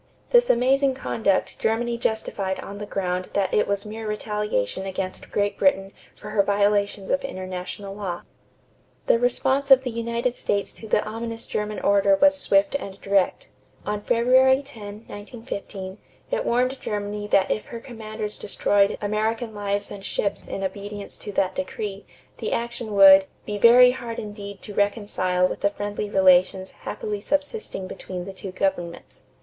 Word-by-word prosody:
This 485 0 +5
amazing 265 +2 +3
conduct 215 -7 0
Germany 235 +2 0
justified 215 -4 -2
on 200 +1 -8
the 210 - -6
ground 185 -2 -2
that 195 -2 0
it - - +3
was 200 0 -1
mere 220 +1 -6
retaliation 210 - -2
against 185 0 -5
Great 205 0 -1
Britain 195 -8 +2 0.2
for 210 - -9
her 210 -1 +4
violations 200 0 +1
of 275 - +1
international 185 -3 -6
law. 190 -4 -5 0.8
The 230 - +4
response 265 +3 +1
of 265 -1 +8
the 250 - -3
United 235 +2 -1
States 200 0 -1
to 220 - -10
the 210 - +2
ominous 230 +1 -5
German 210 0 -3
order 200 0 +4
was 290 +7 +5
swift 200 -8 +2
and 200 -8 -4
direct. 200 - +1 0.4
On 210 0 -2
February 260 +4 +4
10, 215 -5 -10
1915, 205 -3 -7 0.3
it - - 0
warned 255 +2 +1
Germany 205 0 -3
that 195 -2 +3
if 215 - -2
her 235 - -7
commanders 215 -3 -6
destroyed 200 0 +2
American 220 +2 -1
lives 205 -1 -2
and 200 -1 -8
ships 200 0 -2
in 195 - -4
obedience 200 +1 -5
to 205 - -6
that 185 -1 +1
decree, 210 -7 -5 0.3
the - - -3
action 235 -2 -3
would 195 -1 +9 0.2
"be 205 -1 -4
very 250 +3 +8
hard 240 -2 -6
indeed 205 -2 -7
to 210 - -8
reconcile 200 -3 +1
with - - -5
the 200 - +2
friendly 205 0 -4
relations 185 -1 +4
happily 210 -1 -5
subsisting 290 - -2
between 180 -1 -6
the 195 - -7
two 190 0 -7
governments." 185 -2 -3
205 Hz, 155 wpm, -24 LUFS, 195-235 Hz, 0.8 s, would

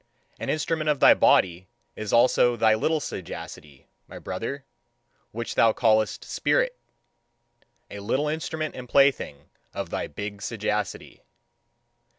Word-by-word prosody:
An - - -4
instrument 155 0 -1
of 145 -2 +1
thy - - +8
body 90 0 +3 0.3
is 110 -1 -5
also 120 0 +4
thy 110 -2 +4
little 155 +9 +1
sagacity, 75 - -8 0.2
my - - -10
brother, 135 +9 -5 0.6
which 115 +1 -5
thou 115 -1 +4
callest 110 -2 +1
"spirit" - - 0 1.2
a 100 - -7
little 130 +9 -1
instrument 155 0 -3
and 125 -1 -9
plaything 135 - +2 0.3
of - - -5
thy - - -3
big 100 +5 -7
sagacity. 105 -1 -3
115 Hz, 125 wpm, -25 LUFS, 105-145 Hz, 1.2 s, thy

